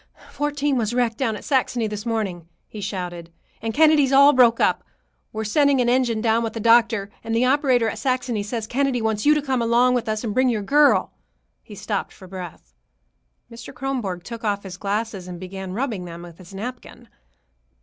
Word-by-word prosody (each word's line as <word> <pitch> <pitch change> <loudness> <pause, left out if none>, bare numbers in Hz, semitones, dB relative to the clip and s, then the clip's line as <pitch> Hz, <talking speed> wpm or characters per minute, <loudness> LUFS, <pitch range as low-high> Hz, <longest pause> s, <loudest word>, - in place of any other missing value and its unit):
"Fourteen 290 -1 -1
was 230 0 -1
wrecked 235 -3 0
down 230 -5 0
at 205 - -9
Saxony 255 -4 0
this 210 +1 -5
morning," 195 -7 -3 0.2
he 210 - -9
shouted, 175 -3 -5 0.3
"and 225 - -2
Kennedy's 300 0 +4
all 280 +2 +7
broke 240 -3 +5
up. - - +2 0.5
We're 220 0 -4
sending 280 +5 +2
an 240 -1 +2
engine 240 -3 +1
down 225 0 +2
with 225 -1 -3
the 225 - -5
doctor, 225 -2 +3
and 225 0 -2
the 240 +2 +3
operator 260 -3 +2
at - - -4
Saxony 255 -4 -1
says 215 +2 -4
Kennedy 265 +1 0
wants 220 +1 -1
you 300 - +6
to 300 - 0
come 260 -3 0
along 240 +2 +3
with 240 -2 -1
us 215 +1 -2
and 220 -3 -3
bring 255 +2 +3
your 215 -4 -1
girl." 290 +7 +3 0.5
He - - -12
stopped - - -4
for 190 - -14
breath. 180 -3 -9 0.8
Mr. 230 0 -10
Kronborg 245 -10 -3
took 230 +3 -8
off 205 -2 -1
his 190 -2 -8
glasses 200 -1 -3
and 180 -1 -8
began 190 0 -7
rubbing 220 -5 -3
them 170 0 -9
with 170 -1 -13
his 185 0 -14
napkin. 240 +3 -8
230 Hz, 195 wpm, -22 LUFS, 205-255 Hz, 0.8 s, all